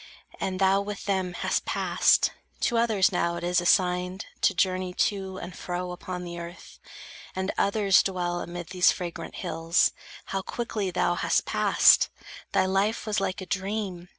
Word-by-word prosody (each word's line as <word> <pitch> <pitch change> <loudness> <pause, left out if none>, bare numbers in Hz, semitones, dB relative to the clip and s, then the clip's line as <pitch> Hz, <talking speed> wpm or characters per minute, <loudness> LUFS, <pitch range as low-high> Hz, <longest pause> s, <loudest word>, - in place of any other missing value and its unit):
And 185 -1 -2
thou 195 +1 +4
with 205 0 -6
them 190 -3 -1
Hast - - -1
passed. - - +2 0.3
To 240 - +1
others 215 -5 +3
now 170 -1 0
it 170 - -6
is 175 0 +2
assigned 180 +1 +1 0.2
To 195 - +3
journey 185 0 0
to 190 -2 -1
and 180 -1 -8
fro 180 0 -4
upon 180 0 -6
the 175 -1 -6
earth, 170 +1 -10 0.6
And 190 +1 -1
others 200 -2 +3
dwell 175 -2 -2
amid 175 -1 -7
these 180 0 +4
fragrant 170 -2 -6
hills. 165 +1 +1 0.3
How 195 - -3
quickly 215 -2 -3
thou 175 0 +1
hast - - +1
passed! - - +5 0.4
Thy - - +3
life 195 +4 0
was 215 -1 0
like 190 0 -2
A - - -6
dream. 190 -2 -3
185 Hz, 160 wpm, -26 LUFS, 175-195 Hz, 0.6 s, passed